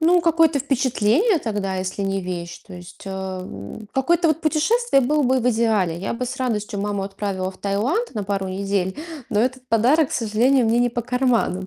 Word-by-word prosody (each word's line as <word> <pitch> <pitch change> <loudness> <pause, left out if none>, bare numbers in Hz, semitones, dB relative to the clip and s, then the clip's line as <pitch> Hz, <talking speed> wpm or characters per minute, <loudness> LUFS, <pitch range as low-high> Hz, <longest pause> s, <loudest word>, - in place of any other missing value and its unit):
Ну, 345 +2 +4
какое-то 330 -3 +3
впечатление 270 - +2
тогда, 205 -6 -2
если 185 +2 -3
не 195 0 -1
вещь. 175 -2 -5
То 190 - -10
есть, 175 0 -12
э, - - -4
м, 190 - -7
какое-то 335 +6 +2
вот 310 0 +1
путешествие 320 - +2
было 295 +4 +2
бы 260 0 +3
в 245 - +2
идеале. 215 -7 +1
Я 195 - -3
бы 250 +2 -3
с 255 +2 -5
радостью 215 -4 -2
маму 205 -1 -2
отправила 195 -1 -3
в 185 - -17
Таиланд 245 - -1
на 210 - -2
пару 195 -1 -2
недель, 190 -1 -1 0.3
но 210 - +2
этот 255 +1 -2
подарок, 255 +7 +3
к - - -5
сожалению, 235 +3 +2
мне 230 +2 +2
не 245 0 +2
по 240 +1 -2
карману, 245 -7 0
225 Hz, 195 wpm, -22 LUFS, 195-270 Hz, 0.3 s, Ну